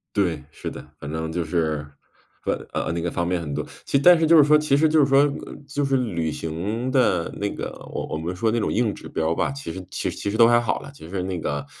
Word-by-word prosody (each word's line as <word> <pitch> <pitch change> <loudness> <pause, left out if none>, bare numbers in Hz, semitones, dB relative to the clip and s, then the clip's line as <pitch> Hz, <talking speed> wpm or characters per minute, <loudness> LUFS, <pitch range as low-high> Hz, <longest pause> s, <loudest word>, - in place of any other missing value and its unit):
对， 85 -7 +1
是 - - -6
的。 - - -9
反 70 +1 -6
正 80 0 -3
就 85 0 -1
是 80 -2 -1 0.6
呃 - - +1 0.2
呃， - - -1
那 85 - -2
个 85 0 -2
方 85 0 -1
面 90 0 0
很 75 -4 -5
多。 75 +1 -2 0.2
其 140 - +2
但 175 +3 +7
是 165 - +3
就 165 +1 +6
是 150 - +9
说 150 +1 +6
其 150 -2 +2
实 155 +2 +4
就 155 0 +4
是 140 - +6
说 140 +1 +5 0.4
就 140 0 -1
是 135 -1 +2
旅 85 -11 -1
行 100 +12 -3
的 125 -10 +2
那 100 0 0
个 - - -4 0.2
我 - - -4
我 - - -3
们 85 +3 -4
说 110 +4 +1
那 115 - +1
种 - - 0
硬 110 -3 +1
指 - - -10
标 80 +1 0
吧， - - 0
其 140 -10 -6
实 95 +2 -7
其 - - -2
实 - - -7
其 100 - -2
实 110 - -2
都 115 - +8
还 120 0 +5
好 120 - -1
了。 140 0 -10
其 80 - -12
实 95 0 -2
那 95 -2 -3
个 75 -2 -3
100 Hz, 290 characters per minute, -24 LUFS, 80-135 Hz, 0.6 s, 是